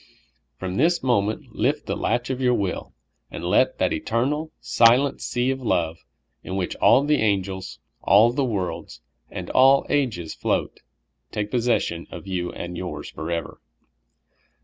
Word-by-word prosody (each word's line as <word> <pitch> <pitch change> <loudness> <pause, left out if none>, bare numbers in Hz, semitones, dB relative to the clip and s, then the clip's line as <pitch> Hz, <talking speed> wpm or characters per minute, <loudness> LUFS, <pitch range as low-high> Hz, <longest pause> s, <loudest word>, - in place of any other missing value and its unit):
From 95 0 -4
this 170 +3 +2
moment 110 -4 0
lift - - 0
the - - -2
latch 120 +1 -1
of 130 0 -3
your 125 -1 +3
will, 95 -5 -3 0.3
and - - -7
let - - +2
that - - +1
eternal, 145 +7 -1
silent 125 +4 +3
sea 125 +2 0
of 135 0 -4
love, 85 -8 0 0.4
in 95 - -5
which 95 -2 -2
all 135 - +5
the 150 -2 +2
angels, 95 -3 -1 0.2
all 110 +4 +5
the 140 +3 0
worlds, 90 - -3 0.3
and - - -6
all 135 +1 +5
ages 115 - -1
float, - - -2 0.5
take 105 0 -3
posses 120 -1 +2
sion 85 0 -5
of - - -9
you 90 -2 -3
and 85 0 -6
3^ours 90 +1 -6
forever. 85 +1 -4
110 Hz, 150 wpm, -24 LUFS, 90-130 Hz, 0.5 s, all